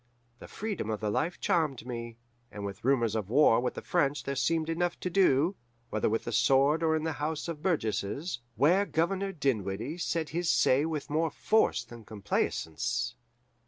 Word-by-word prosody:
The - - -10
freedom 205 - -4
of 110 -1 -2
the 105 -1 -1
life 165 +11 -1
charmed 155 - 0
me, 115 -2 -6 0.3
and 100 -1 -6
with 100 +1 -7
rumours 120 -4 +2
of 105 -3 -2
war 125 -2 +5
with 125 +1 -2
the - - -6
French 145 -5 +1
there 140 - -3
seemed 160 +4 +1
enough 175 +1 -1
to 180 - -2
do, 175 -1 +3 0.4
whether 110 - +1
with 115 +1 -1
the - - -4
sword 135 +5 +3
or 160 -1 +2
in 155 - -1
the 160 - -1
House 155 +2 -2
of 165 -3 -5
Burgesses, 140 - -1 0.2
where 180 +10 +3
Governor 195 +4 0
Dinwiddie 125 - -2
said 165 -2 -1
his 170 +1 -1
say 130 +4 +4
with 155 -2 -4
more 160 +2 +1
force 220 +8 +1
than 120 -2 -12
complaisance. 100 -6 -2
145 Hz, 180 wpm, -29 LUFS, 115-165 Hz, 0.4 s, war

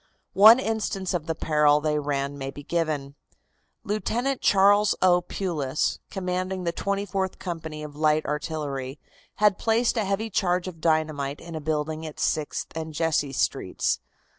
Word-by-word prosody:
One 220 +5 +9
instance 215 -6 -2
of 165 -3 -2
the 160 - -1
peril 150 -2 +3
they 150 0 0
ran 140 -1 -2
may 135 -1 -5
be 145 +1 -9
given. 150 -4 -2 0.7
Lieutenant 240 +5 -1
Charles 205 +1 +4
O. 180 -1 +4
Pulis, 155 -6 -2
commanding 185 0 -3
the 170 - 0
Twenty 200 +3 -2
fourth 190 -1 -2
Company 160 -4 -6
of 150 -1 -8
Light 155 0 +2
Artillery, 145 -3 -3 0.4
had 210 -2 +3
placed 230 +2 +2
a 220 - +2
heavy 205 +3 -2
charge 180 -1 +1
of 165 -3 -8
dynamite 155 -3 0
in 170 - -10
a 160 - -4
building 155 +1 -2
at 155 - -10
Sixth 155 0 -2
and 160 -1 -5
Jesse 155 -3 +1
Streets. 135 - 0
165 Hz, 155 wpm, -25 LUFS, 150-195 Hz, 0.7 s, One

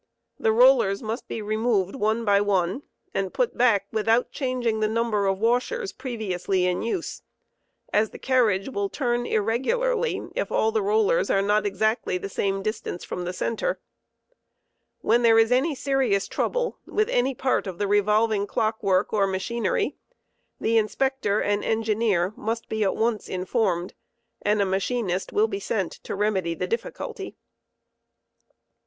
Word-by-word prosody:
The 220 - +2
rollers 235 -4 +4
must 225 +3 -4
be 220 - -5
removed 215 -3 0
one 220 -1 0
by 200 -1 +4
one, 195 +2 0 0.3
and 195 -1 -1
put - - 0
back 225 -5 +3
without 225 +2 +1
changing 250 -5 -1
the 215 - +2
number 220 -2 0
of 195 0 +1
washers 250 - 0
previously 200 -7 -2
in 180 0 0
use, 235 +10 -3 0.7
as 215 0 +3
the - - -10
carriage 225 -7 +2
will 200 -6 -2
turn 240 -2 -1
irregularly 455 - 0
if - - -2
all 445 - +2
the 440 -1 +1
rollers 435 +4 +2
are 195 - +2
not 210 +1 +2
exactly 215 -2 0
the 195 - -6
same 195 0 -1
distance 215 -4 -4
from 180 - -5
the 180 - -2
center. 230 - -2 1.2
When 235 +2 +3
there 230 -1 +5
is 225 +1 +4
any 275 +5 +2
serious 260 -8 +1
trouble - - -1
with 430 0 +1
any 255 +2 +1
part 255 -4 0
of 185 -2 -5
the 205 - 0
revolving 210 +1 +2
clock* 220 0 -1
work 195 0 +1
or 200 -2 +3
machinery 235 - -1 0.6
the 225 0 +3
Inspector 215 -1 0
and 205 0 0
Engineer 215 -4 +1
must 225 +2 -4
be 220 -1 0
at 195 - +1
once 225 -1 -1
informed, 185 -1 -1 0.5
and 210 0 +2
a - - 0
machinist 195 0 -1
will 215 +2 +3
be 195 -2 -4
sent 195 -2 -2
to - - -7
remedy 190 -5 0
the - - -2
difficulty. 440 -3 -5
220 Hz, 155 wpm, -25 LUFS, 200-245 Hz, 1.2 s, there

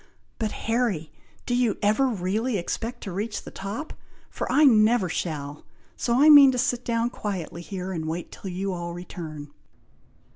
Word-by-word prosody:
But 220 -2 -1
Harry! 225 -9 0 0.3
do 245 - -1
you 245 -4 +1
ever 215 +6 +3
really 215 +2 -1
expect 230 +7 -4
to 195 - -5
reach 210 +4 -3
the - - -10
top? 210 +11 -6 0.4
for - - -4
I 300 - +5
never 220 -6 +5
shall; 150 -4 -4 0.3
so 240 +1 0
I 295 - +6
mean 285 -3 +10
to - - -2
sit 245 -1 0
down 235 0 0
quietly 185 -7 -5
here, 185 +1 -5
and 160 -3 -4
wait 165 +2 -4
till 195 - -8
you 190 +2 -3
all 170 -1 -5
return." 155 -4 -8
205 Hz, 170 wpm, -25 LUFS, 175-240 Hz, 0.4 s, mean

